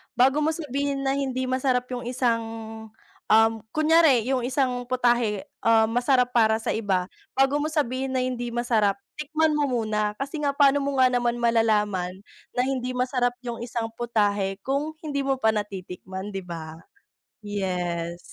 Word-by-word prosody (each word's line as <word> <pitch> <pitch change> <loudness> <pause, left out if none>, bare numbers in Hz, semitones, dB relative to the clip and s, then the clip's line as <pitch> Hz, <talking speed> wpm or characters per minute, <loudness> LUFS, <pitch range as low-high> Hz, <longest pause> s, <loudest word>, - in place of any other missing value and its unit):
bago 265 +4 +4
mo 315 - +2
sabihin 280 -2 -2
na 270 - +1
hindi 260 -2 -1
masarap 255 -1 0
yung 245 -1 -4
isang, 240 -2 +1 0.8
um, 225 +1 +6 0.2
kunyari 310 -5 +5
yung 260 -2 0
isang 255 -1 0
putahe, 240 -5 +1 0.2
um, 225 -1 +3
masarap 250 +1 +2
para 220 -2 +4
sa - - -1
iba. 195 -5 0 0.3
Bago 270 +2 +3
mo 295 - 0
sabihin 270 -4 -1
na 255 - +2
hindi 250 -1 -3
masarap, 230 -4 +1 0.2
tikman 310 +1 +1
mo 295 - +1 0.2
muna 215 -1 0
kasi 280 +3 -4
nga 285 - +2
paano 285 0 +5
mo 280 0 -1
nga 255 - +7
naman 240 -1 +1
malalaman, 210 -6 +1 0.4
na 245 - +2
hindi 255 -2 -2
masarap 250 -1 0
yung 240 -1 -5
isang 235 -1 -3
putahe 205 -5 0
kung 280 +3 -1
hindi 285 -3 -2
mo 270 0 +1
pa 220 -3 +3
natitikman, 190 -1 -5
di 195 - -3
ba? 165 -3 -7 0.7
Yes. 180 -4 -3
245 Hz, 155 wpm, -25 LUFS, 215-270 Hz, 0.8 s, nga